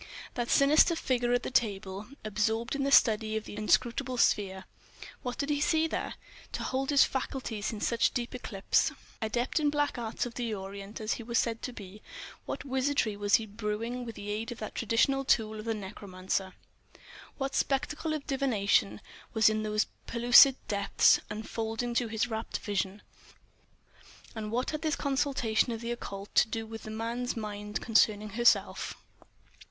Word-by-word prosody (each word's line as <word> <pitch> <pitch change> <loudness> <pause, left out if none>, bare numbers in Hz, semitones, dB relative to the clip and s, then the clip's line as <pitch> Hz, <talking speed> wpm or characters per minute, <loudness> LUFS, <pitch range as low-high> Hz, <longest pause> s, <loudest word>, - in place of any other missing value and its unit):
That 240 -1 -3
sinister 300 +4 +5
figure 245 -6 0
at 245 0 +2
the - - -4
table, 200 -3 -1 0.2
absorbed 220 +2 0
in 275 0 0
study 220 -3 +4
of 220 - -4
the - - -9
inscrutable 245 +4 +1
sphere—what 200 +4 -2
did 285 +1 -1
he 290 -1 0
see 320 +1 +3
there, 325 - -3 0.4
to - - -3
hold 265 +1 -2
his 285 -2 +6
faculties 250 -5 -3
in 215 -2 -7
such 235 -1 +2
deep 240 -1 -3
eclipse? 215 -5 0 0.3
Adept 240 +7 0
in 295 -1 +2
black 290 -3 0
arts 225 0 -2
of 245 - -6
the 235 -3 -2
Orient 195 +1 -8
as 215 0 -1
he - - -6
was 235 +1 -2
said 230 -1 0
to - - -4
be, 205 -2 -11 0.5
what - - -4
wizardry 265 -4 0
was 205 0 +3
he 225 - +1
brewing 220 +3 -4
with 230 -2 -7
the 205 0 -6
aid 220 +3 -3
of 240 - -6
that 215 - -6
traditional 240 +5 +2
tool 220 -4 +1
of 215 - -7
the 225 -1 -1
necromancer? 190 -2 -4 0.8
What 270 -1 -2
spectacle 300 +3 0
of 295 - -6
divination 205 - +1 0.3
was 220 -1 +6
in 215 0 -1
those 215 0 +1 0.2
pellucid 245 +3 +7
depths 200 -1 +4
unfolding 225 +2 -3
to 235 0 +1
his 220 +1 -1
rapt 225 -1 -3
vision? 200 0 -3 1.3
And 215 -2 -5
what 245 +2 -1
had 305 0 -4
this 315 -2 0
consultation 270 -5 +1
of 225 - -3
the 235 +1 -4
occult 200 -4 -6
to - - +5
do 225 0 -4
with 225 0 -8
the - - -6
man's 230 +3 -3
mind 210 -1 -4
concerning 215 -2 +3
herself? 235 +3 +2
225 Hz, 170 wpm, -30 LUFS, 210-250 Hz, 1.3 s, pellucid